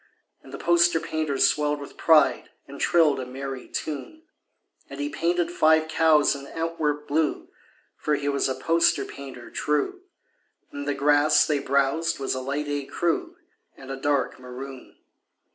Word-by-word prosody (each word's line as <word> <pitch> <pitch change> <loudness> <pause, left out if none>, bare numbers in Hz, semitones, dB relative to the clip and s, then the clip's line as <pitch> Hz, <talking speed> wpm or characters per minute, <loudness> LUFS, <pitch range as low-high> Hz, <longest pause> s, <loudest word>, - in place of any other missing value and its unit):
And 135 - -15
the 140 - -6
poster 170 0 +3
painter 155 -3 -2
swelled 150 +1 +2
with 140 - -10
pride 155 -3 +3 0.2
And 140 0 -10
trilled 160 -5 +3
a 130 - -4
merry 135 0 -6
tune. 155 - -6 0.7
And 140 0 -9
he 145 0 -2
painted 170 +3 0
five 160 -2 +3
cows 160 -2 +4
in 140 0 -9
Antwerp 155 -3 -2
blue 155 +1 -1 0.5
(For 150 - 0
he 145 0 -4
was 140 -1 +1
a 130 - -1
poster 170 +1 +2
painter 135 -4 -10
true), 260 - -1 0.7
And 145 0 -6
the 145 - 0
grass 150 +1 +4
they 150 -2 0
browsed 140 +4 +1
was 135 - -2
a 130 - -3
light 140 +3 -3
écru 165 - -2 0.4
And 135 0 -10
a - - -3
dark 140 -1 -1
maroon. 130 +1 -10
145 Hz, 155 wpm, -25 LUFS, 140-160 Hz, 0.7 s, cows